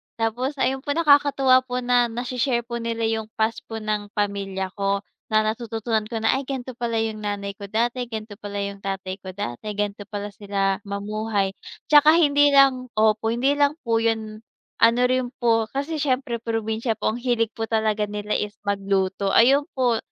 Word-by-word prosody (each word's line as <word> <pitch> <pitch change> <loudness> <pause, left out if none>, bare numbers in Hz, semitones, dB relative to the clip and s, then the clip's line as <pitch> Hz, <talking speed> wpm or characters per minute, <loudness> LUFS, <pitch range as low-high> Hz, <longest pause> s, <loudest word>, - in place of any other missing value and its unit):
tapos 240 +5 -1
ayun 265 -1 0
po, 285 +2 -3
nakakatuwa 285 -4 +5
po 250 0 -2
na 245 -1 +3
nashi-share 245 +1 -1
po 235 0 -5
nila 230 0 -3
yung 220 -1 -1
past 220 +1 0
po 225 - -6
ng 210 -1 -2
pamilya 195 -2 -2
ko, 200 0 0 0.2
na 215 0 +3
natututunan 225 -1 -2
ko 225 -1 -4
na, 240 +4 +3
"Ay 275 - -8
ganto 260 -2 -4
pala 235 -1 -1
yung 220 -1 -3
nanay 200 -1 -4
ko 200 - -7
dati, 240 +3 -1
ganto 215 -2 -7
pa 205 - -7
pala 205 0 -4
yung 200 0 -5
tatay 195 -1 -4
ko 185 -1 -9
dati, 200 - -5
ganto 205 0 -3
pala 205 0 -5
sila 195 -1 -1
mamuhay," 205 0 -2 0.4
'Tsaka 300 +2 +8
hindi 290 -3 +4
lang 265 -2 +5
opo, 215 0 +2
hindi 260 +4 +2
lang 285 0 +2
po 230 -1 +1
yun, 220 -1 -1 0.4
ano 230 +2 +4
rin 255 -1 0
po 225 -2 +3
kasi 285 +4 -3
siyempre 260 -4 0
probinsya 225 0 -2
po, - - -1
ang - - -4
hilig 240 -2 +1
po 225 - -3
talaga 220 -1 0
nila 210 0 -3
is 210 0 -3
magluto, 195 -1 0
ayun 275 +5 +5
po, 245 -3 +2
225 Hz, 180 wpm, -23 LUFS, 205-250 Hz, 0.4 s, Tsaka